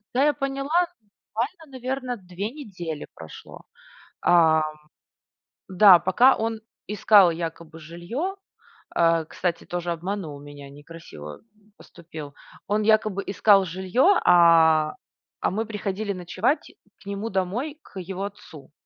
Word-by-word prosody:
Да, 265 - +3
я 295 0 +3
поняла, 275 0 -4 0.3
буквально, 235 - -6
наверно, 255 0 -4
2 190 0 -6
недели 185 - -7
прошло. 80 -1 -12 0.6
Ам, 160 -2 +4 1.1
да, 185 -1 +7
пока 245 +8 +4
он 225 0 -3 0.3
искал 205 -3 +5
якобы 165 -1 -6
жилье 175 - -5 0.6
Э, 165 -1 +3
кстати, 175 0 -3
тоже 175 0 -4
обманул 170 -3 -5
меня, 145 -1 -11
некрасиво, 145 - -11
м, 210 -2 -31
поступил. 160 -4 -11 0.3
Он 210 +1 0
якобы 215 -2 +2
искал 195 0 +4
жилье, 190 - +2
а, 165 -2 +5 0.5
а - - 0
мы 220 +4 -2
приходили 210 -1 -4
ночевать 185 - -2 0.3
к - - -19
нему 200 +3 -4
домой, 210 +11 -2
к 190 - -10
его 190 +2 -5
отцу. 180 -9 -11
190 Hz, 120 wpm, -24 LUFS, 165-220 Hz, 1.1 s, да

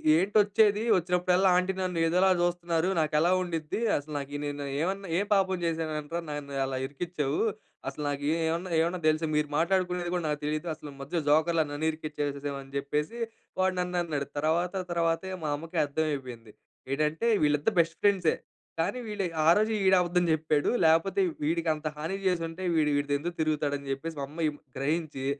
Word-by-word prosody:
ఏంటొచ్చేది? 205 +3 +3
వచ్చినప్పుడల్లా, 180 +2 +2
ఆంటీ 185 +1 +1
నన్ను 180 -3 -1
ఏదోలా 180 +3 +4
జూస్తనారు. 175 0 0
నాకెలా 155 +2 +2
ఉండిద్ది? 165 -1 -3 0.2
అసలు 150 +1 -7
నాకి 145 0 -5
నేను 145 0 -4 0.2
ఏవన్న 195 +3 -2
ఏ - - +3
పాపం 190 -2 +2
చేశాననిరా, 160 -1 -2
నన్ను 145 -1 -5
అలా 135 -1 -3
ఇరికిచ్చేవు? 145 0 -2 0.5
అసలు 140 +2 -4
నాకీ 145 0 -1 0.2
ఏవన్నా 170 +3 -2
ఏవన్నా 170 +2 +1
దెలుసా? 155 +1 +2
మీరు 150 0 +2
మాట్లాడుకునేది 180 0 +1
కూడా, 175 -2 -1
నాకు 150 -1 -1
తెలీదు. 155 +3 -2
అసలు 150 -1 -10
మధ్య 155 +4 -2
జోకర్‌లా 160 +2 +4
నన్ను 145 +2 -3
ఇరికిచ్చేసెసావని 145 -3 -5
జెప్పేసి, 150 +10 -2 0.4
వాడు 185 0 +2
నన్నన్నడు. 175 -5 -1
తర్వాత 170 +5 +1 0.2
తర్వాతే, 170 +2 0
మా 150 - -1
అమ్మకి 165 +3 -7
అర్థవయిపోయింది. 135 -7 -3 0.4
ఏటంటే, 155 +9 0 0.2
వీళ్ళిద్దరు 150 +7 +2
బెస్ట్ 165 0 +2
ఫ్రెండ్సే. 195 -5 +3 0.4
కానీ 210 +10 0
వీడి 210 -3 -2 0.2
ఆ - - +4
రోజే 215 +1 +2
ఈడబద్దం 180 -1 +4
జెప్పేడు. 155 -2 +1 0.2
లేపోతే, 175 +5 +3 0.2
వీడికంత 160 -1 0
హాని 165 +6 -3
చేసుంటే, 170 0 -1
వీడు 150 -2 +3
వీడితో 145 0 -1
ఎందుకు 170 +3 -5
తిరుగుతాడని 145 -2 -1
జెప్పేసి, 160 +4 -4
మా 140 - -2
అమ్మ 160 +2 -2
ఇం 145 - -9 0.2
గ్రహించి, 150 -1 -2
160 Hz, 150 wpm, -28 LUFS, 150-180 Hz, 0.5 s, ఏదోలా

